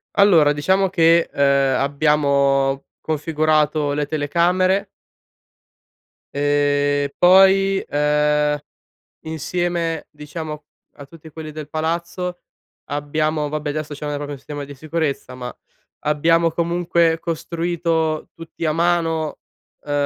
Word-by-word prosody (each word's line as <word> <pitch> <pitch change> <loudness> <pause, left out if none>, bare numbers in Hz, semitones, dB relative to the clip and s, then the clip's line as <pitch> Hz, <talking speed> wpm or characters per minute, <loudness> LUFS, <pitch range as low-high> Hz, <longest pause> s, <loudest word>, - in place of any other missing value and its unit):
Allora 170 -8 +5
diciamo 190 +7 +1
che, 170 -1 +4
uhm, - - -3 0.4
abbiamo 140 -1 +2 0.2
configurato 155 -1 0
le 145 0 -1
telecamere 175 +6 +1 1.5
ehm, 145 0 +1
poi, 195 +1 +5
uhm, 150 0 +2 0.6
insieme 165 +1 -2
diciamo 150 0 -7 0.3
a 140 - -11
tutti 160 +2 -14
quelli 155 0 -8
del 155 -1 -8
palazzo 170 +3 -3 0.5
abbiamo 150 +1 -1
vabbè 150 0 -3
li 150 - -2
associamo 150 -1 -5
al 145 - -2
proprio 145 0 -5
sistema 145 +1 -7
di 140 0 -10
sicurezza, 155 -3 -3
ma 125 -1 -7 0.4
abbiamo 165 +3 +2
comunque 170 0 +1
costruito 165 -1 -2
tutti 165 0 -8
a 155 - +2
mano, 165 -2 0 0.5
uhm, 145 - -5
155 Hz, 105 wpm, -20 LUFS, 145-170 Hz, 1.5 s, Allora